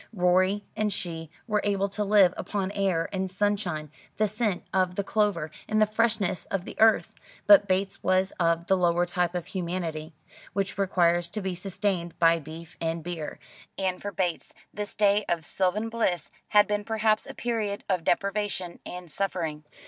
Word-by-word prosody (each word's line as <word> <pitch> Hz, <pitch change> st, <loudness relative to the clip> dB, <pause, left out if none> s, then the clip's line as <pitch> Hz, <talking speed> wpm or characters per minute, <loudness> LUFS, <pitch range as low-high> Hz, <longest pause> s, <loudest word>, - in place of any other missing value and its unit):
Rorie 185 Hz, +2 st, +3 dB
and 215 Hz, -1 st, 0 dB
she 165 Hz, -4 st, -4 dB, 0.2 s
were 210 Hz, -2 st, +1 dB
able 200 Hz, -1 st, +1 dB
to 210 Hz, +2 st, -2 dB
live 200 Hz, -3 st, +5 dB
upon 195 Hz, -2 st, -3 dB
air 190 Hz, -5 st, 0 dB
and 190 Hz, 0 st, -1 dB
sunshine, 185 Hz, -6 st, -1 dB, 0.3 s
the 215 Hz, 0 st, +3 dB
scent 210 Hz, -3 st, -1 dB
of 185 Hz, -1 st, +1 dB
the 200 Hz, -, -1 dB
clover, 200 Hz, -7 st, 0 dB, 0.2 s
and 215 Hz, -, +1 dB
the 215 Hz, -, +6 dB
freshness 215 Hz, -4 st, 0 dB
of 195 Hz, -2 st, -3 dB
the -, -, -8 dB
earth; 220 Hz, 0 st, +4 dB, 0.3 s
but 295 Hz, -10 st, +7 dB
Bates 190 Hz, +1 st, 0 dB
was 185 Hz, +1 st, +2 dB
of 170 Hz, -1 st, +2 dB
the 190 Hz, -, +3 dB
lower 175 Hz, -1 st, +2 dB
type 175 Hz, -1 st, -1 dB
of 175 Hz, -, -2 dB
humanity, 170 Hz, -4 st, -4 dB, 0.4 s
which 195 Hz, 0 st, -1 dB
requires 175 Hz, -3 st, +2 dB
to 210 Hz, -, -3 dB
be 190 Hz, -1 st, -2 dB
sustained 180 Hz, -1 st, -2 dB
by 165 Hz, 0 st, +4 dB
beef 160 Hz, +2 st, -10 dB
and 165 Hz, 0 st, -2 dB
beer; 165 Hz, -3 st, -5 dB, 0.4 s
and 185 Hz, -1 st, -1 dB
for 205 Hz, -, -4 dB
Bates 180 Hz, -3 st, -2 dB, 0.2 s
this 210 Hz, 0 st, -4 dB
day 205 Hz, 0 st, +3 dB
of 165 Hz, -3 st, 0 dB
sylvan 190 Hz, +6 st, +1 dB
bliss 225 Hz, -7 st, -1 dB, 0.2 s
had 210 Hz, -1 st, +5 dB
been 210 Hz, 0 st, -1 dB
perhaps 215 Hz, 0 st, +1 dB
a -, -, -8 dB
period 220 Hz, -4 st, -2 dB
of 185 Hz, -4 st, 0 dB
deprivation 195 Hz, -1 st, -1 dB
and 180 Hz, 0 st, -8 dB
suffering. 165 Hz, -5 st, -2 dB
190 Hz, 170 wpm, -27 LUFS, 175-205 Hz, 0.4 s, but